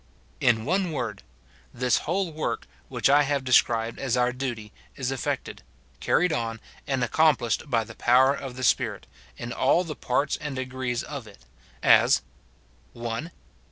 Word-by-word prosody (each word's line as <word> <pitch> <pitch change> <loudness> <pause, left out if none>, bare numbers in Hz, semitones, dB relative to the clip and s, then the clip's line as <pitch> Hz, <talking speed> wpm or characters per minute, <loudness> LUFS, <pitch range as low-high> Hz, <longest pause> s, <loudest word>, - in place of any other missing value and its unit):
In 115 -3 +2
one 185 +3 0
word: 120 -8 -4 0.5
This 125 -1 +2
whole 185 0 0
work, 155 0 -3 0.2
which - - +1
I 145 +2 +6
have 140 -1 0
described 115 -3 +2
as 130 -2 0
our 125 0 +2
duty, 120 -5 -5 0.2
is 130 -1 -2
efi"ected, 135 -3 -3 0.4
carried 180 -2 +2
on, 115 -4 -2 0.3
and 135 -2 0
accomplished 145 0 +2
by 115 -3 +2
the - - -11
power 130 +3 +4
of 135 -3 -6
the 130 - -6
Spirit, - - +1 0.3
in 120 0 -5
all 155 +7 +3
the 160 -4 -6
parts 140 +3 0
and 150 -3 -5
degrees 130 -1 -3
of 140 -6 -7
it; 80 - -16 0.4
as, - - +5 0.3
— 65 +1 -34
(1.) 120 +6 -4
130 Hz, 155 wpm, -26 LUFS, 120-145 Hz, 0.5 s, I